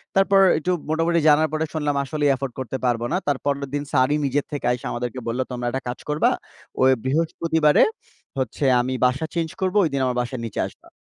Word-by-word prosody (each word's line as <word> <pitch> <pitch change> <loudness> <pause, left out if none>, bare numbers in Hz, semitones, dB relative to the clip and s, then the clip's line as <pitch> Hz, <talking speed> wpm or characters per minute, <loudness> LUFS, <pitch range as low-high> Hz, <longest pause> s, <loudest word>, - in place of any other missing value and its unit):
তারপর 195 0 +4 0.2
একটু 180 +4 -1 0.2
মোটামুটি 165 +1 +2
জানার 155 +1 +5
পরে 160 +1 0
শুনলাম 150 -2 -1
আসলেই 145 +1 0
এফোর্ড 130 -2 -5
করতে 130 +1 -3
পারবো 120 -1 +1
না। - - +2
তারপরের 140 0 -1
দিন 145 0 -1
স্যারই 145 +2 +3
নিজের 140 +1 0
থেকে 145 -4 -4
আইসা 125 - -3
আমাদেরকে 125 +1 -4
বলল, 120 +3 -2
"তোমরা 120 -1 -3
একটা 135 +2 -3
কাজ 120 - -4
করবা, 150 +1 +2 0.5
ওই 130 0 +6
বৃহস্পতিবারে 160 +1 +2 0.5
হচ্ছে 130 +2 -2 0.2
আমি 130 +1 -2
বাসা 130 +5 +1
চেঞ্জ 165 -1 -1
করব, 185 +2 0
ঐদিন 140 -4 0
আমার 125 -1 -1
বাসার 125 0 -5
নিচে 115 - -5
আসবা।" - - -17
140 Hz, 190 wpm, -23 LUFS, 130-155 Hz, 0.5 s, ওই